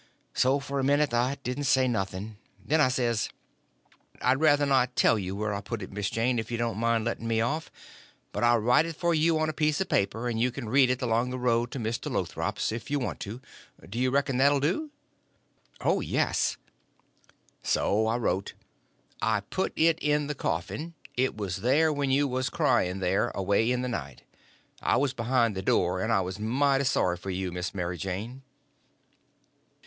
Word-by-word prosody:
So 135 +2 +3
for 140 +1 -3
a - - 0
minute 145 0 +2
I 125 +4 +1
didn't 125 +4 -3
say 130 0 +3
nothing; 100 -1 -3 0.3
then 155 +1 +3
I 140 - +5
says: 120 -4 0 0.9
"I'd 130 +3 +2
ruther 145 -2 +4
not 130 -3 +2
tell 115 - +4
you 95 0 -4
where 105 0 -2
I 100 - -3
put 105 0 -5
it, - - -8
Miss 100 0 -2
Mary 115 +2 +2
Jane, 125 -2 +1
if 110 - -5
you 120 - -2
don't 115 -3 -2
mind 115 -1 +1
letting 115 -1 -3
me 115 -1 +1
off; 150 +8 -1 0.6
but - - -3
I'll 120 0 +5
write 125 +8 +3
it 165 - -6
for 170 +2 +1
you 160 +1 +3
on 155 0 +1
a 155 - -2
piece 150 -1 +1
of 190 - -1
paper, 110 +4 0
and 115 -2 -1
you 125 - +3
can 120 -2 -6
read 130 +1 +5
it 125 0 -1
along 120 +1 +1
the 130 - -4
road 120 -1 +1
to 135 - -4
Mr. 115 0 -3
Lothrop's, - - -2
if 115 +1 -6
you 145 - +1
want 130 - -3
to. 110 +6 -6 0.5
Do 115 +5 -5
you 130 0 +2
reckon 135 -1 +1
that 140 +2 +5
'll 145 - +2
do?" 180 - -1 0.9
"Oh, - - +2
yes." - - 0 1.0
So 110 +2 +1
I 115 +2 +1
wrote: 100 -5 -1 0.7
"I - - +1
put - - -2
it 165 0 +3
in 150 0 +1
the 150 - -3
coffin. 160 +3 -3 0.2
It 130 -3 0
was 95 -3 -3
in - - -13
there 155 +5 +4
when 140 -1 -1
you 140 +2 +3
was 130 -1 -1
crying 90 +2 +1
there, 95 +1 +1
away 100 +4 +1
in 125 0 0
the - - -1
night. 70 - -5 0.6
I - - +2
was 135 0 +1
behind 120 -3 +1
the 95 - -3
door, 90 -1 +1
and 110 - 0
I 100 -3 +3
was 95 +2 -5
mighty 135 +5 +2
sorry 90 -8 +1
for 95 - -8
you, 95 -1 -2
Miss 90 +3 -4
Mary 90 -2 -3
Jane." 105 - -5
120 Hz, 205 wpm, -28 LUFS, 110-140 Hz, 1.0 s, I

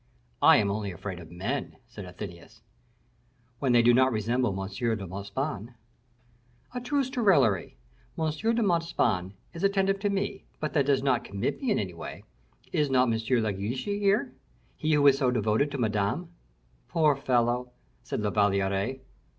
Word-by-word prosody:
"I - - +8
am 100 -2 +2
only 100 -1 -3
afraid 90 +1 -6
of 80 -2 -11
men," 105 +11 -4
said 110 -5 -9
Athenais. 90 +4 -10 1.0
"When 135 -3 +1
they 120 -1 +5
do 120 +1 +6
not 130 +2 +4
resemble 120 +3 0
M. 95 - -3
de 110 0 -2
Montespan." 100 - -5 1.0
"A 250 - -4
truce 270 +1 -1
to 255 -3 -2
raillery. 130 - +3 0.4
M. 160 -1 0
de 225 +8 0
Montespan 165 - +1 0.2
is 170 +2 -7
attentive 195 0 +2
to 205 0 0
me, 200 0 -2 0.2
but 155 - -3
that 140 -3 +2
does 135 -2 +2
not 130 -3 +2
commit 100 +4 -3
me 265 - -1
in - - +2
any 95 -4 -3
way. 85 - -8 0.5
Is 150 -2 +1
not 125 -3 +3
M. 110 - 0
de 110 -2 +1
Guiche 105 +7 -3
here, 200 0 +1 0.4
he 155 - -1
who 145 -1 +3
is 140 -1 +6
so 130 - +3
devoted 115 +3 +1
to 140 - -5
Madame?" 110 - -1 0.6
"Poor 155 -3 +3
fellow!" 125 -2 +1 0.3
said - - -4
La 105 -1 0
Valliere. 100 +5 +1
125 Hz, 165 wpm, -28 LUFS, 100-155 Hz, 1.0 s, I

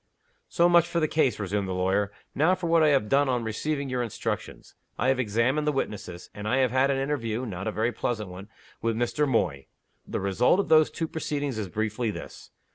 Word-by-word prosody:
"So 170 - +4
much 170 -1 +5
for 170 0 -1
the 155 - +2
case," 135 -8 +1
resumed 100 0 -1
the 95 - -3
lawyer. 95 +2 +1 0.2
"Now 160 +6 +3
for 185 -1 -6
what 165 0 +4
I 155 - +5
have 135 -7 +3
done 140 +3 +3
on 125 -2 0
receiving 140 +6 -2
your 125 -1 -1
instructions. 115 -4 -4 0.2
I 130 - +1
have 135 -1 +2
examined 125 +6 +1
the - - +4
witnesses; 100 -10 -5
and 105 +1 -6
I 130 - +2
have 130 -3 +2
had 130 +2 +3
an 135 - +1
interview 130 -4 -2
(not 95 -4 -5
a - - 0
very 115 +3 0
pleasant 110 -6 -3
one) 95 +3 -10 0.3
with 115 -1 0
Mr. 120 +6 0
Moy. 85 - 0 0.4
The - - -3
result 100 - +2
of 200 - -1
those 155 -1 +6
two 165 - -3
proceedings 145 -6 -3
is 100 -4 -4
briefly 110 +3 -1
this. 105 - -8
125 Hz, 215 wpm, -27 LUFS, 105-150 Hz, 0.4 s, those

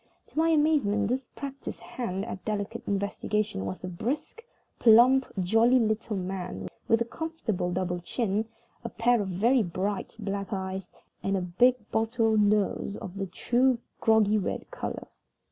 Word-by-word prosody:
To - - -3
my 325 +1 +4
amazement, 290 -10 +3
this 255 0 -1
practiced 275 -1 -6
hand 195 -5 -4
at 195 -5 -7
delicate 205 -2 -3
investigations 200 - -1
was 95 - -5
a - - -3
brisk, 260 - -4 0.4
plump, 245 +3 +6
jolly 225 +7 +4
little 220 -2 0
man, 180 - -4 0.2
with 225 0 +3
a - - +2
comfortable 235 - -3
double 180 -1 -1
chin, 210 +3 -1 0.4
a - - -4
pair 235 0 +2
of 200 - -3
very 230 +8 +3
bright 195 +2 -3
black 200 -1 -4
eyes, 190 -1 -4 0.3
and 195 0 0
a - - -1
big 240 +9 +4 0.2
bottle 225 0 +2
nose 205 -1 +2
of 185 - -8
the 195 -1 -2
true 245 +7 +2 0.2
groggy 215 -1 +4
red 195 - -4
color. - - -5
215 Hz, 150 wpm, -28 LUFS, 190-240 Hz, 0.4 s, plump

